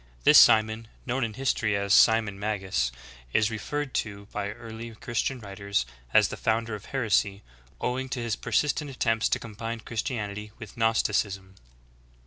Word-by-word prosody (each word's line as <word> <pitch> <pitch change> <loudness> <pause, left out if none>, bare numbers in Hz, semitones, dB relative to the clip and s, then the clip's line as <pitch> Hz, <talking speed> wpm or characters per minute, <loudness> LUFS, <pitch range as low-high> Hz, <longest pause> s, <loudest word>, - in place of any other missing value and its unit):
* - - -29
This - - +9
Simon, 110 0 +5 0.2
known 130 +2 -1
in 110 -2 -3
history 120 -5 0
as 100 0 +1
Simon 110 -3 +5
Magus, 95 - -1 0.4
is 110 0 +3
referred 145 +6 -3
to 100 -2 -9
by 100 -1 -3
early 115 0 -8
Christian 120 +4 -2
writers 100 - -2 0.3
as - - +5
the - - -6
founder 115 0 0
of 105 0 -7
heresy, 105 -5 0 0.4
owing 130 +1 -2
to 130 - -3
his 115 -2 -1
persistent 150 +2 0
attempts 115 -4 +1
to - - +2
combine 115 +1 -6
Christianity 105 -3 -4
with 110 -3 -10
Gnosticism. 100 -4 0
110 Hz, 150 wpm, -27 LUFS, 100-115 Hz, 0.4 s, This